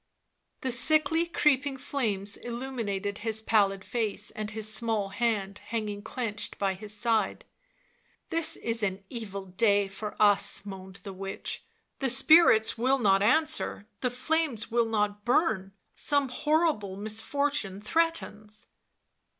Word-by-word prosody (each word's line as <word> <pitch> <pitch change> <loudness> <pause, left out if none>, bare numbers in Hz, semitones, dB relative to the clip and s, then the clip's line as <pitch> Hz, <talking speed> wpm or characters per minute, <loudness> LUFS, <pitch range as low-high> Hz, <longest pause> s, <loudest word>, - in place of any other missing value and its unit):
The 260 - -1
sickly 310 +6 +3
creeping 285 -4 +1
flames 210 -8 -1
illuminated 230 -5 -4
his 220 0 -2
pallid 200 -3 +2
face 215 -3 -2
and 215 -1 -5
his 220 0 -3
small 220 -3 0
hand,, 205 -2 -1
hanging 210 -3 -3
clenched 220 -1 -5
by 195 -1 0
his 205 +2 -9
side. 215 -1 -1 0.4
" - - -39
This 330 -1 +2
is 230 0 -2
an 195 -1 -2
evil 200 -5 -6
day 200 +1 +2
for 210 +2 -7
us," 205 -1 +3
moaned 190 -2 -9
the 200 -3 -7
witch, 195 +1 -5 0.2
" - - -49
the 270 - 0
spirits 260 -4 +6
will 260 +3 +3
not 195 -5 +3
answer, 310 -1 +1
the 250 - 0
flames 255 -3 0
will 235 0 +2
not 210 -1 -1
burn... 220 - +1 0.2
some 285 -2 +1
horrible 295 - 0
misfortune 220 0 -1
threatens." 215 -6 -2
220 Hz, 135 wpm, -28 LUFS, 200-260 Hz, 0.4 s, spirits